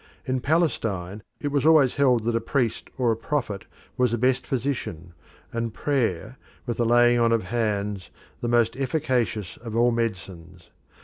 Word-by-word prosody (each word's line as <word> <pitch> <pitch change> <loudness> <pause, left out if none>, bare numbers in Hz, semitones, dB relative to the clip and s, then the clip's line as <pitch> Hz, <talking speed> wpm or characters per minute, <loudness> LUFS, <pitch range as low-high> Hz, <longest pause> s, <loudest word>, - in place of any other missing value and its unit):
In 130 0 0
Palestine 115 - 0 0.2
it 145 - -2
was 140 -1 0
always 155 -5 +5
held 125 -5 +3
that 115 +1 0
a 115 - +1
priest 120 -1 -1
or 125 -3 +2
a - - +1
prophet 115 -4 -3 0.3
was 125 -1 +3
the 120 - -1
best 125 +2 +1
physician, 115 - -3 0.4
and 115 -1 -3
prayer, 125 - -1 0.3
with 120 -3 -3
the 120 - +1
laying 120 +1 +5
on 115 0 +3
of 115 -3 +2
hands, 105 -2 -2 0.3
the 120 - -3
most 120 -1 +2
efficacious 125 - -1
of 115 -1 -7
all 120 +1 +4
medicines. 95 -7 -5
120 Hz, 165 wpm, -25 LUFS, 105-130 Hz, 0.4 s, always